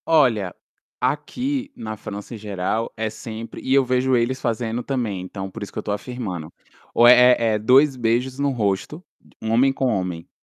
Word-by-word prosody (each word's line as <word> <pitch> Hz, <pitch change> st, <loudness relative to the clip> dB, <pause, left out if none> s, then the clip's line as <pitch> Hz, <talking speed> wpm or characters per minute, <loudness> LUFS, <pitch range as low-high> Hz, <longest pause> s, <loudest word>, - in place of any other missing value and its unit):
Olha, 120 Hz, -, +3 dB, 0.4 s
aqui 255 Hz, -, -2 dB
na 110 Hz, -, -6 dB
França 105 Hz, +1 st, -8 dB
em -, -, -6 dB
geral 105 Hz, +2 st, -2 dB
é 110 Hz, 0 st, -1 dB
sempre 115 Hz, 0 st, -8 dB
e 130 Hz, -, -3 dB
eu 135 Hz, -1 st, +5 dB
vejo 130 Hz, +1 st, +2 dB
eles 125 Hz, +2 st, 0 dB
fazendo 115 Hz, 0 st, -1 dB
também, 115 Hz, -9 st, -2 dB
então 95 Hz, +1 st, -6 dB
por -, -, -9 dB
isso 100 Hz, -, -6 dB
que -, -, -11 dB
eu -, -, -1 dB
estou 105 Hz, -, -2 dB
afirmando, 105 Hz, -8 st, -5 dB, 0.4 s
ou 120 Hz, -, +6 dB
é 125 Hz, 0 st, +8 dB
é 110 Hz, -2 st, +1 dB
2 130 Hz, +6 st, +5 dB
beijos 125 Hz, +2 st, 0 dB
no 140 Hz, 0 st, +2 dB
rosto, 120 Hz, -, -2 dB, 0.4 s
homem 115 Hz, +5 st, +3 dB
com 135 Hz, 0 st, -2 dB
homem, 90 Hz, -8 st, -1 dB
115 Hz, 180 wpm, -22 LUFS, 105-130 Hz, 0.4 s, é